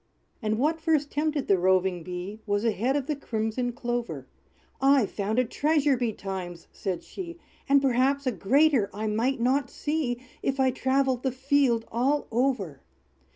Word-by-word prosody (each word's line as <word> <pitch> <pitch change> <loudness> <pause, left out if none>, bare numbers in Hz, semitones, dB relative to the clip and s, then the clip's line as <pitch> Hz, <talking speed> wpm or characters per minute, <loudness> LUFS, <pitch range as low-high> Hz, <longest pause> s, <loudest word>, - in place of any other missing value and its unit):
And 215 -1 0
what 315 +6 +1
first 310 -3 +1
tempted 300 -1 -1
the 195 -2 +4
roving 185 -1 +2
Bee, 180 +4 -6
Was 205 +2 0
a 230 - +4
head 240 +7 0
of 285 -3 0
the 300 +1 -1
crimson 235 -1 -2
clover. 240 0 -3 0.6
"I've 270 -5 +4
found 210 +2 -2
a 255 - +3
treasure 290 +2 +2
betimes!" 190 -7 -4
said 185 -3 -4
she, 345 -3 -8 0.3
"And 280 0 +5
perhaps 270 +2 +2
a 255 - +2
greater 260 +1 +3
I 215 +1 -3
might 230 +5 0
not 255 +2 +1
see, 295 -5 -2 0.2
If 270 0 -1
I 260 -1 +4
travelled 260 -1 +1
the 265 - 0
field 260 -3 +2
all 270 +6 +1
over. 230 - 0
250 Hz, 160 wpm, -27 LUFS, 215-275 Hz, 0.6 s, And